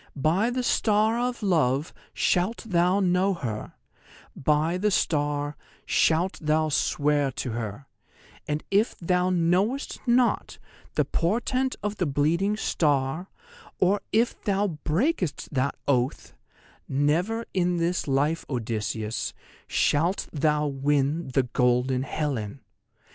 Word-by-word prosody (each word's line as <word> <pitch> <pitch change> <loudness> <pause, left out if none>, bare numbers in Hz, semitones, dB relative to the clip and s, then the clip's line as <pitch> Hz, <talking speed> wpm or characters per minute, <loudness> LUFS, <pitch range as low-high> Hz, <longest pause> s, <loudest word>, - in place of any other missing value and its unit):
_ - - -27 0.2
"By 175 - +2
the 250 +1 -2
Star 220 0 +2
of 245 -2 -2
Love 155 -5 +1 0.2
shalt 185 +6 0
thou 180 0 +3
know 185 +1 +2
her; 115 -9 -5 0.6
by 155 +5 +1
the 210 +2 +2
star 145 -5 0 0.3
shalt 170 +4 +2
thou 155 0 +1
swear 145 -1 +1
to 125 -2 -4
her; 115 +3 -5 0.6
and 150 0 -2
if 205 +4 +2
thou 180 +1 +1
knowest 185 +9 +1
not 240 +1 +2 0.4
the - - +2
portent 245 +8 0
of 210 0 -2
the 180 - 0
Bleeding 170 +9 +1
Star, 150 -1 0 0.5
or 195 +3 +2
if 230 +2 +1
thou 200 0 +1
breakest 185 - 0
that 135 +1 0
oath, 130 -2 0 0.6
never 165 +12 +1
in 180 -1 +1
this 170 0 0
life, 145 +4 +1
Odysseus, 110 -3 -3 0.3
shalt 170 +6 +1
thou 150 0 +1
win 145 +2 0
the 130 0 +1
golden 125 +1 +1
Helen! 135 -5 -3
160 Hz, 120 wpm, -26 LUFS, 140-195 Hz, 0.6 s, thou